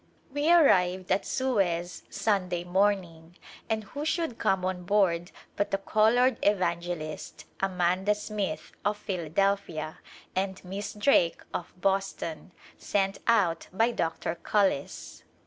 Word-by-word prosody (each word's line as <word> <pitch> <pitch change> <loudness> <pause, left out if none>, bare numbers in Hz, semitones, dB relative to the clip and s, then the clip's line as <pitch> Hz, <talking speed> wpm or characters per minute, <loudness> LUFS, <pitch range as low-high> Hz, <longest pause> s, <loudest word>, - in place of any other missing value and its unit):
We 290 +3 +2
arrived 185 - +4
at - - +1
Suez 190 -10 0
Sunday 195 -4 0
morning 175 -3 0 0.3
and 220 -1 0
who 285 +8 -6
should 320 -5 -1
come 190 -1 +1
on 185 -1 -2
board 175 -3 +2 0.3
but 205 - 0
the 195 - +1
colored 225 +5 +3
evangelist, 170 -5 -1
Amanda 185 +2 +1
Smith, 200 -7 -4
of 205 +1 0
Philadelphia, 175 -3 -1 0.4
and 190 0 -1
Miss 195 +3 -5
Drake, 205 -6 +3
of 175 +1 -6
Boston, 190 -4 -1 0.3
sent 195 -1 0
out 190 -8 +2
by 225 +5 +2
Dr. 165 -5 -2
Cullis. 180 -3 -1
190 Hz, 115 wpm, -28 LUFS, 175-210 Hz, 0.4 s, arrived